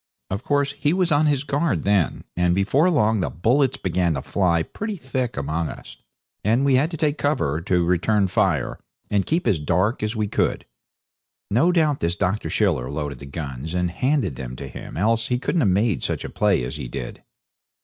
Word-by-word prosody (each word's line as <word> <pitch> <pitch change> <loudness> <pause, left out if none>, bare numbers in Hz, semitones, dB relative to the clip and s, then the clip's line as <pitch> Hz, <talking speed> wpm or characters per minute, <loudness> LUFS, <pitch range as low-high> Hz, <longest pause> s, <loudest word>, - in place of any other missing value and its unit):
Of 100 +5 -3
course 145 -1 +1
he 145 - +2
was 180 -2 +1
on 150 +1 +4
his 145 -2 +1
guard 145 +2 0
then, 100 -4 +1
and 90 0 +2
before 130 - +3
long 110 - +2
the 90 - 0
bullets 130 - +1
began 90 -3 0
to 65 - -4
fly 85 -4 +1
pretty 210 - -5
thick 130 - -3
among 75 +3 -1
us, - - -10 0.5
and 115 +6 +2
we 140 - +3
had 135 +5 +3
to 165 - -5
take 150 0 0
cover 80 - 0
to 90 0 +1
return 95 +4 +2
fire - - 0 0.3
and 100 -2 +1
keep 165 +3 0
as 100 -9 +2
dark 90 - +1
as 110 +2 -2
we 105 -1 0
could. - - 0 0.9
No 130 - +4
doubt 155 -5 +2
this 85 +1 0
Dr. 100 +2 -1
Schiller 65 0 +1
loaded 75 -3 -4
the 70 - -9
guns 70 +1 -5
and 90 -1 0
handed 125 - 0
them 65 -1 -6
to - - -7
him, - - -9
else 115 +4 +1
he 125 - +1
couldn't 160 +6 0
have 105 - +3
made 100 +2 +1
such - - -3
play 100 -9 +2
as 60 - -4
he - - -5
did. - - -6
105 Hz, 200 wpm, -23 LUFS, 85-140 Hz, 0.9 s, on